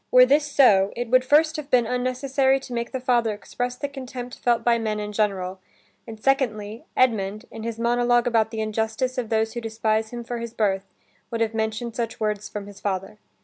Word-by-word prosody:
Were 250 0 +8
this 290 +2 +2
so, 205 -9 +5
it 240 -1 -4
would 255 0 +5
first 310 +4 +4
have 300 -2 -6
been 245 -3 +4
unnecessary 260 +2 +1
to 250 - -8
make 235 0 -3
the 260 - -3
father 240 -4 +1
express 245 +4 -4
the 285 - -3
contempt 255 -2 -8
felt 235 -1 +2
by 235 0 +3
men 215 -1 -2
in 210 0 -4
general, 195 -3 -1 0.5
and, 220 -1 -8
secondly, 225 -4 0
Edmund, 215 -3 +1
in 225 - -8
his 230 0 -4
monolog 240 +1 +2
about 225 -3 +2
the 220 -1 -4
injustice 220 +4 -1
of 235 -3 -4
those 220 0 +1
who 240 - -4
despise 220 -1 0
him 240 0 -6
for 240 0 -4
his 230 0 -6
birth, 195 -2 0 0.4
would 230 -1 -3
have 225 0 +1
mentioned 220 +1 -2
such 230 -2 -3
words 210 -1 -2
from 205 -1 -6
his 205 -1 -12
father. 195 +1 -3
230 Hz, 205 wpm, -24 LUFS, 215-250 Hz, 0.5 s, Were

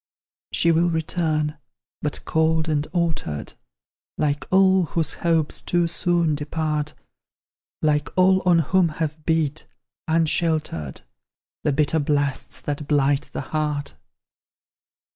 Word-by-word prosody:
She 170 - +4
will 170 +2 +3
return, 155 -2 -1 0.4
but 150 - -4
cold 160 0 +1
and 150 -1 0
altered, 165 - -2 0.6
Like 145 -1 -1
all 190 -1 +5
whose 160 0 -1
hopes 165 -3 +1
too 175 -1 +1
soon 170 -1 +1
depart; 150 0 -2 0.9
Like 150 -1 +2
all 185 +1 +5
on 180 -3 +4 0.2
whom 185 -3 +5
have 155 -1 -3
beat, 155 -2 0 0.4
unsheltered, 160 - 0 0.6
The 150 - +2
bitter 150 +3 +1
blasts 145 -2 -1
that 145 0 -4
blight 140 -1 +2
the - - -4
heart. 150 -2 -1
155 Hz, 110 wpm, -23 LUFS, 150-170 Hz, 0.9 s, all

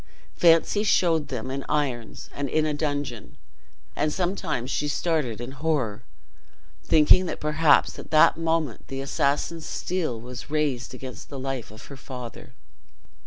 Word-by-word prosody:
Fancy 170 +4 +4
showed 165 -7 +3
them 125 -1 -4
in 135 0 -3
irons 130 -6 -2
and 140 -1 -3
in 155 +3 +2
a 155 - 0
dungeon, 145 -6 -3 0.6
and 150 +1 +1
sometimes 175 -8 -2
she 150 - 0
started 145 -6 -1
in 120 +2 -6
horror, 135 -7 -1 0.8
thinking 165 +4 +5
that - - -4
perhaps 150 +1 +3
at - - -10
that 155 0 +6
moment 165 -5 -1
the 135 - -5
assassin's 140 +4 -1
steel 165 -11 -2
was 125 +4 -9
raised 140 -5 -1
against 130 0 -9
the 140 - -7
life 135 -2 -4
of 110 +1 -12
her 140 - -10
father. 125 -3 -9
145 Hz, 145 wpm, -25 LUFS, 125-160 Hz, 0.8 s, that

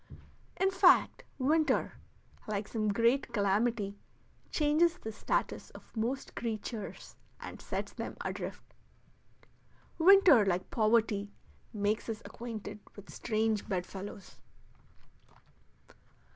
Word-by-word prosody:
In 385 0 +3
fact, 375 -1 +4
winter, 305 +4 +2 0.5
like 210 -1 -2
some 215 -2 -2
great 235 +5 +2
calamity, 205 -1 0 0.5
changes 320 +3 +2
the 220 - -6
status 210 - -2
of - - -19
most 240 +5 -2
creatures 220 -2 -5 0.2
and - - -9
sets - - -4
them - - -6
adrift. - - -6 1.3
Winter, 355 - +7
like 185 -2 -1
poverty, 215 -2 +2 0.4
makes 210 +2 -1
us 220 -1 -4
acquainted 215 -3 -7 0.2
with 205 -1 -12
strange 220 -1 -1
bedfellows. 190 +1 -5
220 Hz, 95 wpm, -32 LUFS, 205-265 Hz, 1.3 s, Winter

